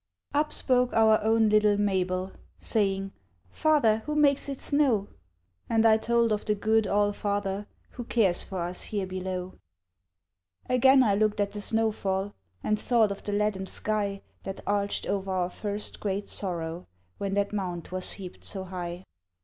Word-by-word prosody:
Up 300 Hz, +1 st, +1 dB
spoke 250 Hz, -1 st, +2 dB
our 220 Hz, -1 st, +4 dB
own 225 Hz, 0 st, +3 dB
little 210 Hz, -1 st, +4 dB
Mabel, 185 Hz, -2 st, 0 dB, 0.3 s
Saying, 195 Hz, -3 st, 0 dB, 0.4 s
"Father, 275 Hz, -, +3 dB
who 300 Hz, -, -1 dB
makes 285 Hz, -2 st, +3 dB
it 275 Hz, -, -4 dB
snow?" 265 Hz, -9 st, +2 dB, 0.6 s
And 225 Hz, 0 st, +3 dB
I 220 Hz, -1 st, +6 dB
told 235 Hz, 0 st, +2 dB
of 210 Hz, 0 st, 0 dB
the 210 Hz, -, 0 dB
good 220 Hz, +1 st, +2 dB
All 205 Hz, 0 st, +2 dB
father 205 Hz, 0 st, -2 dB, 0.2 s
Who 245 Hz, -, -7 dB
cares 200 Hz, -8 st, +2 dB
for 190 Hz, -3 st, -5 dB
us 175 Hz, +1 st, -3 dB
here 205 Hz, -3 st, -2 dB
below. 185 Hz, 0 st, -5 dB, 1.1 s
Again 265 Hz, +1 st, +5 dB
I 210 Hz, -4 st, +3 dB
looked 210 Hz, +1 st, +1 dB
at 200 Hz, -1 st, +1 dB
the 210 Hz, -, -6 dB
snow 225 Hz, +1 st, +1 dB
fall, 195 Hz, -1 st, -2 dB, 0.3 s
And 215 Hz, 0 st, +1 dB
thought 225 Hz, -4 st, +2 dB
of 200 Hz, -, -5 dB
the 205 Hz, -, -3 dB
leaden 205 Hz, -2 st, 0 dB
sky 200 Hz, -1 st, -2 dB, 0.2 s
That 195 Hz, -, -6 dB
arched 200 Hz, 0 st, -1 dB
o'er 195 Hz, -1 st, -2 dB
our 180 Hz, -1 st, -1 dB
first 205 Hz, +1 st, -4 dB
great 200 Hz, 0 st, -2 dB
sorrow, 170 Hz, -2 st, -3 dB, 0.3 s
When 195 Hz, -1 st, -2 dB
that 200 Hz, 0 st, 0 dB
mound 180 Hz, -5 st, -3 dB
was 185 Hz, 0 st, -5 dB
heaped 185 Hz, -2 st, -10 dB
so 190 Hz, -2 st, -4 dB
high. 180 Hz, -1 st, -6 dB
205 Hz, 165 wpm, -27 LUFS, 190-220 Hz, 1.1 s, I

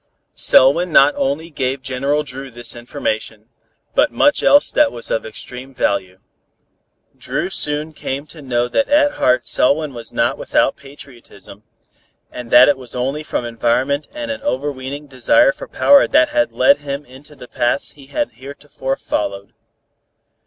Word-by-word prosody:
Selwyn 165 Hz, +7 st, +4 dB
not 145 Hz, -1 st, +6 dB
only 155 Hz, +5 st, -2 dB
gave 135 Hz, -2 st, -3 dB
General 140 Hz, +3 st, -1 dB
Dru 135 Hz, -1 st, -9 dB
this 120 Hz, 0 st, -7 dB
information, 110 Hz, -2 st, -5 dB, 0.4 s
but -, -, +3 dB
much 290 Hz, -, +2 dB
else 285 Hz, +1 st, +4 dB
that 300 Hz, -2 st, +3 dB
was 115 Hz, -, -5 dB
of 110 Hz, -, -2 dB
extreme 125 Hz, +4 st, -10 dB
value. 95 Hz, -4 st, -1 dB, 1.0 s
Dru 155 Hz, +9 st, -4 dB
soon 150 Hz, 0 st, 0 dB
came 140 Hz, 0 st, -5 dB
to 155 Hz, 0 st, -12 dB
know 120 Hz, -3 st, -1 dB
that 280 Hz, -, 0 dB
at 290 Hz, 0 st, +4 dB
heart 125 Hz, 0 st, +2 dB
Selwyn 145 Hz, +2 st, +1 dB
was 115 Hz, -2 st, -7 dB
not -, -, 0 dB
without -, -, +1 dB
patriotism, 125 Hz, -8 st, -14 dB, 0.7 s
and 125 Hz, -1 st, -8 dB
that 125 Hz, +2 st, +7 dB
it 140 Hz, -2 st, +2 dB
was 125 Hz, -2 st, -8 dB
only 135 Hz, +4 st, -2 dB
from 140 Hz, -5 st, -4 dB
environment 120 Hz, +5 st, -1 dB
and 295 Hz, -1 st, -4 dB
an 280 Hz, -, -6 dB
overweening 145 Hz, -, -4 dB
desire 295 Hz, -, +3 dB
for -, -, -10 dB
power 285 Hz, -, +4 dB
that 310 Hz, +1 st, +3 dB
had 300 Hz, 0 st, 0 dB
led 280 Hz, -, +3 dB
him 140 Hz, 0 st, -6 dB
into 135 Hz, +3 st, -16 dB
the 125 Hz, -, -12 dB
paths 120 Hz, +4 st, -1 dB
he 140 Hz, -2 st, -17 dB
had 295 Hz, -, -2 dB
heretofore 135 Hz, 0 st, -6 dB
followed. 100 Hz, -1 st, -4 dB
135 Hz, 155 wpm, -18 LUFS, 125-155 Hz, 1.0 s, that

